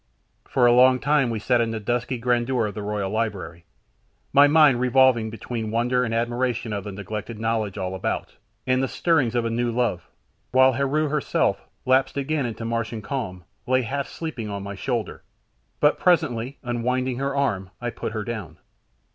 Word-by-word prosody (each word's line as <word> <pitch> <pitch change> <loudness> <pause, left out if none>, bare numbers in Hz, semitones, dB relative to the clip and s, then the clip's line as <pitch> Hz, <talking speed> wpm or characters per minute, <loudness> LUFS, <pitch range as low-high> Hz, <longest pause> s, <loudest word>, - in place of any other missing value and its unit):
For 125 - +3
a 120 - +6
long 130 +1 +6
time 145 -2 +2
we 115 - -2
sat 120 +3 +2
in 115 - 0
the 115 -1 -3
dusky 120 +4 -1
grandeur 120 0 +1
of 105 - -4
the 105 - -5
royal 100 -2 -2
library, 95 -7 -3 0.7
my 140 +1 +7
mind 145 -4 +5
revolving 125 -2 +4
between 115 0 -5
wonder 120 +3 +1
and 115 - -2
admiration 120 0 -1
of 100 -2 -3
the 105 - -5
neglected 105 +3 -6
knowledge 110 -3 -1
all 95 -1 -3
about, 95 - -3 0.3
and 130 0 +2
the 135 - +1
stirrings 135 -9 +1
of 120 -1 +1
a 115 - -1
new 120 +1 0
love, 115 -7 -1 0.4
while 130 +1 +5
Heru 140 +4 0
herself, 150 0 0 0.2
lapsed 130 +2 +2
again 140 -1 -1
into 115 0 -6
Martian 115 -1 -3
calm, 105 -6 -4 0.2
lay 130 0 +2
half 140 +4 -3
sleeping 135 -10 -5
on 100 -1 -5
my 100 0 -5
shoulder, 120 +2 -3 0.6
but 150 0 +3
presently, 140 -8 +1
unwinding 125 +1 -1
her 140 0 -1
arms, 100 -10 0
I 120 -1 -3
put - - -5
her 110 -2 -3
down. 110 -6 -6
120 Hz, 180 wpm, -24 LUFS, 110-130 Hz, 0.7 s, my